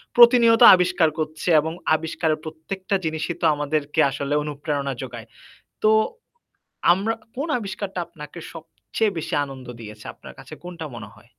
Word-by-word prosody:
প্রতিনিয়ত 235 Hz, -1 st, +7 dB
আবিষ্কার 180 Hz, -2 st, +2 dB
করছে 155 Hz, +2 st, -3 dB
এবং 160 Hz, +2 st, -2 dB, 0.2 s
আবিষ্কারের 160 Hz, 0 st, -2 dB
প্রত্যেকটা 185 Hz, +5 st, -4 dB
জিনিসই 160 Hz, +2 st, -2 dB
তো -, -, +1 dB
আমাদেরকে 145 Hz, 0 st, -2 dB
আসলে 140 Hz, +1 st, -3 dB
অনুপ্রেরণা 145 Hz, -1 st, -3 dB
যোগায়। 120 Hz, -3 st, -8 dB, 0.6 s
তো 215 Hz, -, +5 dB, 1.0 s
আমরা 200 Hz, +5 st, +1 dB, 0.2 s
কোন 280 Hz, +5 st, -3 dB
আবিষ্কারটা 195 Hz, -2 st, -5 dB
আপনাকে 150 Hz, +1 st, -11 dB
সবচেয়ে 185 Hz, +6 st, -3 dB
বেশি 160 Hz, -, -5 dB
আনন্দ 135 Hz, -2 st, -10 dB
দিয়েছে? 105 Hz, -1 st, -11 dB
আপনার -, -, -13 dB
কাছে -, -, -12 dB
কোনটা 175 Hz, -2 st, -7 dB
মনে 105 Hz, -3 st, -9 dB
হয়? 110 Hz, +3 st, -20 dB
160 Hz, 135 wpm, -23 LUFS, 145-185 Hz, 1.0 s, প্রতিনিয়ত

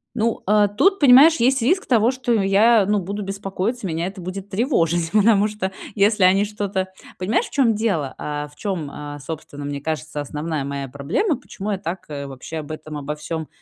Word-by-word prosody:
Ну, 230 Hz, -1 st, 0 dB
а 210 Hz, +1 st, +4 dB
тут, 385 Hz, -, +2 dB
понимаешь, 290 Hz, +4 st, +7 dB
есть 260 Hz, +1 st, +2 dB
риск 360 Hz, +11 st, +2 dB
того, 235 Hz, 0 st, +3 dB
что 255 Hz, -2 st, -1 dB
я, 210 Hz, +1 st, +4 dB
ну, 210 Hz, +1 st, +1 dB
буду 200 Hz, +3 st, -4 dB
беспокоиться, 195 Hz, +3 st, -3 dB
меня 165 Hz, +1 st, -2 dB
это 190 Hz, +1 st, -8 dB
будет 185 Hz, +2 st, -6 dB
тревожить, 175 Hz, -, +1 dB
потому 210 Hz, -1 st, +4 dB
что 210 Hz, -3 st, -4 dB, 0.2 s
если 205 Hz, 0 st, +3 dB
они 190 Hz, +2 st, +5 dB
что-то 200 Hz, -2 st, -3 dB, 0.3 s
Понимаешь, 210 Hz, -, 0 dB
в -, -, -12 dB
чём 255 Hz, -5 st, +3 dB
дело, 190 Hz, -11 st, -1 dB
а, 150 Hz, 0 st, -4 dB
в 145 Hz, -, -21 dB
чём, 185 Hz, -8 st, -3 dB
а, 145 Hz, 0 st, -7 dB
собственно, 145 Hz, -1 st, -7 dB
мне 145 Hz, 0 st, -4 dB
кажется, 155 Hz, -1 st, -4 dB
основная 150 Hz, +1 st, -3 dB
моя 140 Hz, -1 st, -4 dB
проблема, 160 Hz, -, -1 dB
почему 210 Hz, -5 st, -6 dB
я 200 Hz, -, -1 dB
так, 180 Hz, 0 st, -5 dB
э, 140 Hz, -1 st, -5 dB
вообще 135 Hz, +4 st, -8 dB
об 155 Hz, -1 st, -6 dB
этом 155 Hz, -1 st, -7 dB
обо 145 Hz, +1 st, -4 dB
всём 160 Hz, +1 st, -5 dB
195 Hz, 195 wpm, -21 LUFS, 155-220 Hz, 0.3 s, понимаешь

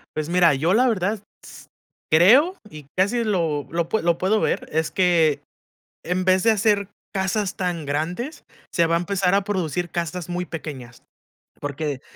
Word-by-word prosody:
Pues 155 Hz, -1 st, -2 dB
mira, 175 Hz, -2 st, +4 dB
yo 160 Hz, +7 st, +1 dB
la 250 Hz, +4 st, +4 dB
verdad 200 Hz, -2 st, 0 dB
s 205 Hz, -, -15 dB, 0.9 s
creo, 245 Hz, -, +6 dB
y 150 Hz, -6 st, -12 dB
casi 215 Hz, +6 st, +2 dB
lo 165 Hz, -9 st, -1 dB
lo 165 Hz, 0 st, -2 dB
pue 220 Hz, -, 0 dB
lo 170 Hz, 0 st, +1 dB
puedo 200 Hz, +5 st, +1 dB
ver, -, -, -1 dB
es 160 Hz, 0 st, 0 dB
que 170 Hz, -5 st, +2 dB, 0.6 s
en 180 Hz, +1 st, -1 dB
vez 185 Hz, 0 st, +3 dB
de 225 Hz, -, +5 dB
hacer 205 Hz, -2 st, +1 dB, 0.2 s
casas 190 Hz, +1 st, -1 dB
tan 175 Hz, -4 st, -3 dB
grandes, 175 Hz, -, -3 dB, 0.3 s
se 170 Hz, -, +2 dB
va 165 Hz, 0 st, +1 dB
a -, -, +2 dB
empezar 185 Hz, 0 st, 0 dB
a 200 Hz, 0 st, +3 dB
producir 180 Hz, -4 st, -2 dB
casas 170 Hz, 0 st, -4 dB
muy 175 Hz, +1 st, -2 dB
pequeñas. 140 Hz, -8 st, -8 dB, 0.6 s
Porque 145 Hz, -1 st, -4 dB
180 Hz, 170 wpm, -23 LUFS, 160-200 Hz, 0.9 s, creo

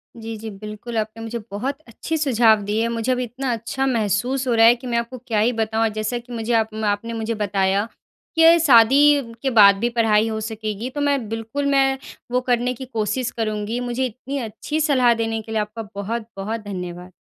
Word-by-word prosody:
जी, 225 Hz, -1 st, -7 dB
जी, 220 Hz, +1 st, -7 dB
बिल्कुल, 215 Hz, +3 st, -7 dB
आपने 220 Hz, +1 st, -3 dB
मुझे 235 Hz, +1 st, -4 dB
बहुत 255 Hz, +8 st, -3 dB
अच्छे 315 Hz, +8 st, -4 dB
सुझाव 235 Hz, -7 st, +4 dB
दिए। 220 Hz, +3 st, 0 dB
मुझे 235 Hz, +2 st, -1 dB
अभी 250 Hz, 0 st, 0 dB
इतना 250 Hz, +2 st, -3 dB
अच्छा 235 Hz, +4 st, -3 dB
महसूस 245 Hz, +3 st, 0 dB
हो 245 Hz, -, +2 dB
रहा 225 Hz, 0 st, +6 dB
है 235 Hz, +1 st, +7 dB
कि 250 Hz, +1 st, -10 dB
मैं 235 Hz, -1 st, 0 dB
आपको 235 Hz, +2 st, -3 dB
क्या 220 Hz, -3 st, +1 dB
ही 225 Hz, +4 st, +3 dB
बताऊँ। 225 Hz, 0 st, 0 dB
जैसा 215 Hz, +3 st, -2 dB
कि 240 Hz, +1 st, -10 dB
मुझे 230 Hz, +1 st, -2 dB
आप 220 Hz, -1 st, +1 dB
आपने 205 Hz, +3 st, -1 dB
मुझे 225 Hz, 0 st, -2 dB
बताया 200 Hz, 0 st, 0 dB, 0.5 s
कि 325 Hz, +1 st, +7 dB
शादी 275 Hz, -1 st, +5 dB
के 270 Hz, -, 0 dB
बाद 205 Hz, -4 st, +7 dB
भी 235 Hz, +3 st, +1 dB
पढ़ाई 225 Hz, -2 st, +2 dB
हो 220 Hz, -1 st, -3 dB
सकेगी, 220 Hz, +1 st, -4 dB
तो 290 Hz, +3 st, -5 dB
मैं 280 Hz, -5 st, +1 dB
बिल्कुल, 225 Hz, +6 st, -3 dB
मैं 270 Hz, -1 st, +3 dB, 0.3 s
वो 250 Hz, -, +1 dB
करने 245 Hz, +1 st, +1 dB
की 260 Hz, +2 st, -8 dB
कोशिश 230 Hz, +1 st, -2 dB
करूँगी। 215 Hz, +1 st, -2 dB
मुझे 245 Hz, +1 st, -1 dB
इतनी 255 Hz, +4 st, -5 dB
अच्छी 235 Hz, +6 st, -4 dB
सलाह 255 Hz, -5 st, +4 dB
देने 225 Hz, -1 st, -2 dB
के 220 Hz, -, -11 dB
लिए 220 Hz, -1 st, +1 dB
आपका 210 Hz, +1 st, -6 dB
बहुत-बहुत 220 Hz, 0 st, -4 dB
धन्यवाद। 180 Hz, -2 st, -7 dB
230 Hz, 200 wpm, -22 LUFS, 215-250 Hz, 0.5 s, है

